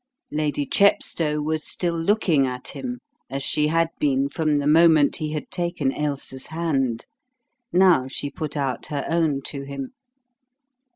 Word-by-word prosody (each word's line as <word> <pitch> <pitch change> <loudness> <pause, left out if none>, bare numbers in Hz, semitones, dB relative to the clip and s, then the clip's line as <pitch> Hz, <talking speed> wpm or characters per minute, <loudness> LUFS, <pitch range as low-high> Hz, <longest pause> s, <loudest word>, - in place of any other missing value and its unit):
Lady 150 -1 -1
Chepstow 160 -6 +2
was 155 0 -1
still 175 -2 -2
looking 165 -5 +2
at 125 0 -3
him 250 -1 -5 0.3
as 135 +1 -4
she 150 +2 +2
had 165 +1 +2
been 140 -1 +1
from 155 0 0
the 145 -1 0
moment 155 -1 +5
he 155 -1 -3
had 150 - -5
taken 175 -6 -1
Ailsa's 140 -3 -3
hand. 140 -8 -1 0.7
Now 180 -8 +4
she 140 +2 -4
put 150 -1 -5
out 135 -4 -2
her 145 -2 -3
own 160 -5 +1
to 140 +1 -4
him. 140 - -6
150 Hz, 150 wpm, -23 LUFS, 140-165 Hz, 0.7 s, moment